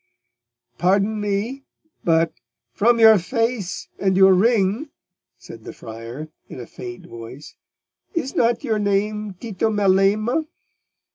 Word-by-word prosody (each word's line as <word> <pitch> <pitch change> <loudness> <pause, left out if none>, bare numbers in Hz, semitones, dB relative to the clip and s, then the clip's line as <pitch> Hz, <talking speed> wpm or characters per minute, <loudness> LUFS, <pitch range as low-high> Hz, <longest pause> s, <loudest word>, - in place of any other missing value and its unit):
"Pardon 200 +4 +2
me, 210 +7 -2 0.4
but—from 175 +7 0
your 220 -2 +8
face 225 0 -2
and 190 -1 +1
your 190 0 +7
ring,"—said 185 - -2
the - - -8
friar, 115 +7 -9 0.2
in - - -9
a 120 - -7
faint 120 0 -9
voice, 115 +5 -10 0.6
"is 275 -5 -2
not 235 +2 +2
your 220 -5 0
name 205 0 -1
Tito 220 +2 -2
Melema?" 210 +7 +2
200 Hz, 110 wpm, -22 LUFS, 170-225 Hz, 0.6 s, your